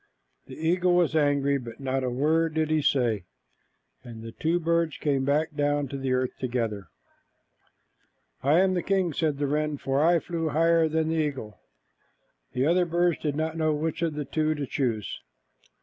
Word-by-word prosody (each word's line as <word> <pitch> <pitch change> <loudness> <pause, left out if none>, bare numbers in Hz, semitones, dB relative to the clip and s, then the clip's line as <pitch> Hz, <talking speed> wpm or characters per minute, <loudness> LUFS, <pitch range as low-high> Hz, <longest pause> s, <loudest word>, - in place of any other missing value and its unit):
The - - -9
eagle 175 +3 +2
was 175 -2 +2
angry, 140 -2 +2
but 115 -2 -9
not 135 -1 -1
a 130 - 0
word 155 +5 +1
did 155 -1 0
he 155 -1 +2
say, 120 -9 +1 0.8
and 115 -2 -10
the 115 - -7
two 165 +8 0
birds 170 -1 0
came 140 -3 0
down 145 -1 0
to 140 - -6
the 135 -1 -2
earth 130 0 -1
together. 115 -7 -2 1.5
"I 150 +6 +4
am 190 -1 +2
the 180 - 0
king," 190 -4 0
said 155 -3 0
the 145 - -1
wren, 150 +1 -1
"for 135 +2 0
I 170 +1 +5
flew 165 -1 -3
higher 165 +2 +3
than 160 0 0
the 165 - 0
eagle." 130 -8 -5 0.9
The 125 +2 +1
other 175 +3 +3
birds 175 0 +1
did 150 -2 -2
not 160 +1 -2
know 155 -1 +1
which 160 +3 -3
of 165 -3 -1
the 150 -1 -3
two 155 +1 0
to 145 -2 -3
choose. 120 -6 -2
150 Hz, 180 wpm, -26 LUFS, 135-165 Hz, 1.5 s, I